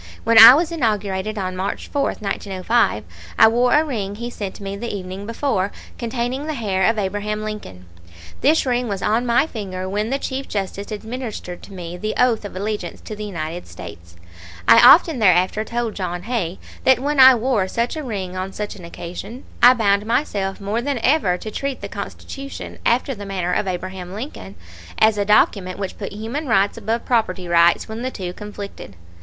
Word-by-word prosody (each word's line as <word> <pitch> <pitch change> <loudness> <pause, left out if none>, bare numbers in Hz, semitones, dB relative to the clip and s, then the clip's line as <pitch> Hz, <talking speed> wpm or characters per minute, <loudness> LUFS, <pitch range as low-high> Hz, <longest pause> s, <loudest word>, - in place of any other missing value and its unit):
When 230 0 +6
I 230 +3 +12
was 330 +2 0
inaugurated 215 - -1
on 185 -2 -3
March 190 +2 -3
4, 285 - -1
1905, 200 - 0 0.3
I - - +8
wore 245 +4 +3
a 300 - +5
ring 205 -8 -3
he 235 +3 -6
sent 200 -5 -6
me 195 -1 -5
the 235 +4 -5
evening 190 0 -6
before, 225 -5 -1 0.3
containing 245 +4 -3
the 310 - -2
hair 195 -5 +1
of 225 - 0
Abraham 210 +2 -2
Lincoln. 205 - -7 0.6
This 300 +3 +3
ring 245 -1 0
was 200 -3 -3
on 225 +3 +1
my 235 +5 +3
finger 190 -9 -5
when 210 +3 -2
the 270 - 0
Chief 270 0 -4
Justice 200 0 -4
administered 220 -4 -6
to 200 - -13
me 175 -1 -7
the 215 +3 -3
oath 240 -4 +2
of 200 - -8
allegiance 205 -2 -4
to 215 - -7
the 210 0 -6
United 170 -3 -5
States; 85 +1 -11 0.5
I 115 - +8
often 320 -4 +7
thereafter 185 +1 +3
told 235 0 -3
John 180 -2 -4
Hay 200 -6 -2 0.3
that 260 - +5
when 285 +2 -1
I 260 0 +10
wore 230 -5 0
such 235 +8 -2
a 310 - -4
ring 195 -7 -4
on 185 +1 -4
such 210 0 -5
an 190 - -12
occasion 175 +9 -8 0.2
I 245 +2 +8
bound 205 -2 +1
myself 205 -6 -1
more 205 +3 -2
than 280 +1 -2
ever 255 - +3
to 215 - -7
treat 275 +4 -4
the - - -5
Constitution, 275 0 -8
after 250 +3 +2
the 205 -4 -8
manner 180 -2 -2
of 195 - 0
Abraham 185 0 -5
Lincoln, 150 - -7 0.4
as 220 -1 +4
a 200 - +1
document 195 -3 +2
which 195 -2 -5
put 200 - -5
human 230 +9 -5
rights 200 -4 +2
above 230 +1 -3
property 195 -7 0
rights 170 0 +4
when 220 +1 -6
the 255 - -2
two 185 -7 -6
conflicted. 205 - -9
210 Hz, 190 wpm, -21 LUFS, 190-240 Hz, 0.6 s, I